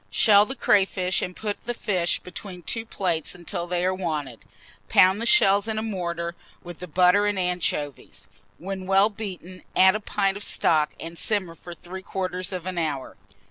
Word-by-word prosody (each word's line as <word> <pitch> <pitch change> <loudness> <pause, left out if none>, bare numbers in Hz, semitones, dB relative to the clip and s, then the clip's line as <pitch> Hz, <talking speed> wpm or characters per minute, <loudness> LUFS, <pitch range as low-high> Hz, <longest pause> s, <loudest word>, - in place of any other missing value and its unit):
Shell 205 - +5
the 265 - -5
crayfish, 190 -5 +2
and 180 - -4
put 210 -2 -4
the 240 0 -3
fish 180 -6 0
between 180 0 -9
two 225 +6 -2
plates 175 -8 -1
until 175 0 -5
they 175 0 -1
are 185 - +1
wanted; 155 - -4 0.5
pound 190 +3 +5
the 230 - 0
shells 200 - +5
in 220 -1 -2
a 215 - -1
mortar, 170 -5 -3 0.3
with 175 -1 -10
the 180 - -7
butter 180 +5 +4
and 205 -1 -1
anchovies; 175 -6 -2 0.3
when 190 0 -6
well 195 +2 +4
beaten, 185 -4 -8
add 190 0 +6
a - - -1
pint 200 -2 -1
of 205 - -6
stock, 150 -6 +2
and 165 +1 -8
simmer 195 -6 0
for 175 +1 -11
3/4 185 +1 -4
of 180 -2 -5
an 185 -2 -3
hour. 150 -5 -3
185 Hz, 180 wpm, -24 LUFS, 175-200 Hz, 0.5 s, add